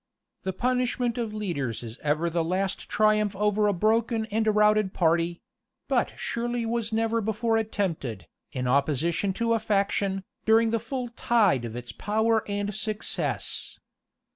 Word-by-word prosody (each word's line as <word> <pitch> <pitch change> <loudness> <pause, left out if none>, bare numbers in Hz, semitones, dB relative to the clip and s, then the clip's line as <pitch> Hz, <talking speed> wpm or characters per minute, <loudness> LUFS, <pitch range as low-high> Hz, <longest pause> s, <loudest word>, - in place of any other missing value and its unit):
The 190 - -2
punishment 250 +1 0
of 230 -2 -2
leaders 165 - -3
is 115 +1 -9
ever 155 +3 +1
the 170 0 0
last 190 +3 -2
triumph 215 -1 +2
over 210 +1 +2
a - - +4
broken 220 +4 +1
and 220 +1 +1
routed 210 -2 +3
party; 170 0 +1 0.4
but - - +1
surely 240 0 -2
was 230 -1 -1
never 225 +1 +1
before 220 +2 0
attempted, 170 - -2 0.3
in 125 -1 -2
opposition 150 +8 +1
to 230 +3 +1
a 225 - +2
faction, 200 -2 0 0.2
during 225 +1 +4
the 230 - +1
full 245 +2 -4
tide 215 - +2
of 115 0 -6
its 120 0 -6
power 220 +1 +1
and 205 0 -2
success. 215 +1 -2
210 Hz, 145 wpm, -27 LUFS, 175-225 Hz, 0.4 s, a